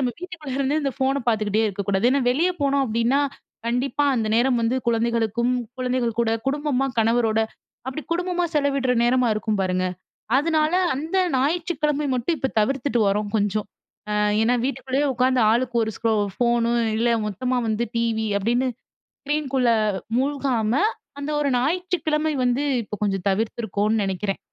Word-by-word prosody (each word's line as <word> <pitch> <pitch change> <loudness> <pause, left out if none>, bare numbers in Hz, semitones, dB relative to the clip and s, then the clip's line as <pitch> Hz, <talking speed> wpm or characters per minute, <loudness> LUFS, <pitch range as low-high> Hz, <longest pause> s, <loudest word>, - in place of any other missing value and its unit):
நம்ம 250 -2 +1
வீட்டுக்குள்ள 350 -5 -8
இருந்தே 275 +2 +1
இந்த 275 - 0
ஃபோன 270 +1 +1
பார்த்துக்கிட்டே 215 -1 +1
இருக்கக்கூடாது. 200 0 -2
ஏன்னா, 280 - +2
வெளியே 330 +8 +2
போனோம் 280 0 +2
அப்டின்னா, 235 +3 +1 0.5
கண்டிப்பா 255 +5 0
அந்த 220 -3 0
நேரம் 245 +1 +3
வந்து 235 +3 +1
குழந்தைகளுக்கும், 235 0 +1 0.3
குழந்தைகள் 250 -3 -1
கூட 230 -1 +1 0.2
குடும்பமா 280 -1 0
கணவரோட. 225 0 +2 0.5
அப்டி 265 +4 -5
குடும்பமா 355 0 0
செலவிடுற 275 -3 +1
நேரமா 250 0 +3
இருக்கும் 215 -1 -1
பாருங்க. 185 0 0 0.5
அதுனால 310 +2 +2 0.2
அந்த 315 +7 -3 0.2
ஞாயிற்றுக்கிழமை 300 0 0
மட்டும் 255 +7 0
இப்ப 265 - -1
தவிர்த்துட்டு 260 +2 0
வரோம் 205 +1 -1
கொஞ்சம். 205 0 0 0.4
ஆ - - -1 0.3
ஏன்னா, 240 +2 +3
வீட்டுக்குள்ளேயே 270 +1 -1
உட்காந்து 255 +1 +2
ஆளுக்கு 245 +1 0
ஒரு 220 - -3
ஸ்க்ரோ 225 -1 +1 0.2
ஃபோனு 235 -1 +1 0.2
இல்ல 230 +2 +1 0.2
மொத்தமா 250 +5 -1
வந்து 220 +2 0
டிவி 225 -1 0
அப்டின்னு 240 +5 +1 0.6
ஸ்க்ரீன்குள்ள 275 -4 0 0.5
மூழ்காம 260 -5 0 0.5
அந்த 285 +1 -4
ஒரு 290 - +1
ஞாயிற்றுக்கிழமை 315 +1 0
வந்து 250 +3 +1 0.2
இப்போ 210 - -6
கொஞ்சம் 195 -2 -1
தவிர்த்துக்கோன்னு 215 +1 0
நெனைக்கிறேன் 195 +1 -2
250 Hz, 140 wpm, -23 LUFS, 225-280 Hz, 0.6 s, நேரம்